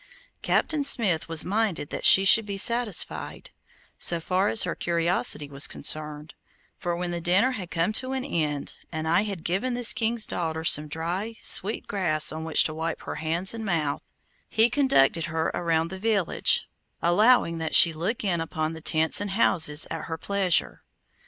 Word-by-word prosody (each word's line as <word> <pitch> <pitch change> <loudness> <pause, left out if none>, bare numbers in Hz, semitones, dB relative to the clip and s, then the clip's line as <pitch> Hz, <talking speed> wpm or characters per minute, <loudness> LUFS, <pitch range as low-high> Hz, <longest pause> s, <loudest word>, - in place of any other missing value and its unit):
Captain 305 -3 0
Smith 205 - +1
was 165 -1 +3
minded 200 -6 -2
that - - -4
she 195 - +8
should 225 +3 +6
be 200 -1 -6
satisfied, 235 -2 -1 0.5
so 170 - +1
far 185 +4 -1
as 220 - +3
her 175 - -3
curiosity 170 -4 -1
was 140 0 0
concerned, 150 0 -4 0.4
for 175 -1 -4
when 175 0 -4
the 170 0 -5
dinner 190 +9 +2
had 190 -8 -7
come 170 +5 -1
to 255 +4 -1
an 265 0 -3
end, 150 - -4
and 160 -1 -5
I 170 +4 +2
had 195 -6 -6
given 200 +8 -2
this 245 -1 +4
king's 225 -1 0
daughter 160 -3 -4
some 155 -1 +4
dry, 175 +9 -5
sweet 210 +4 +2
grass 170 -7 0
on 160 +1 -7
which 160 -1 +5
to 155 - -1
wipe 160 +1 -5
her - - -7
hands 165 +5 -1
and 225 -1 -7
mouth, 160 -8 -2 0.5
he 225 +2 +2
conducted 170 - +2
her 160 -1 -3
around 165 -1 -1
the 190 - -8
village, 205 -4 0 0.3
allowing 175 -1 +2
that 160 -1 -2
she 165 - +7
look 185 +10 -4
in 175 -5 -1
upon 155 0 -4
the 160 - -10
tents 160 +4 +1
and 205 - -4
houses 165 -7 +2
at 165 -1 -5
her 160 - -6
pleasure. 195 0 -1
175 Hz, 180 wpm, -25 LUFS, 160-210 Hz, 0.5 s, she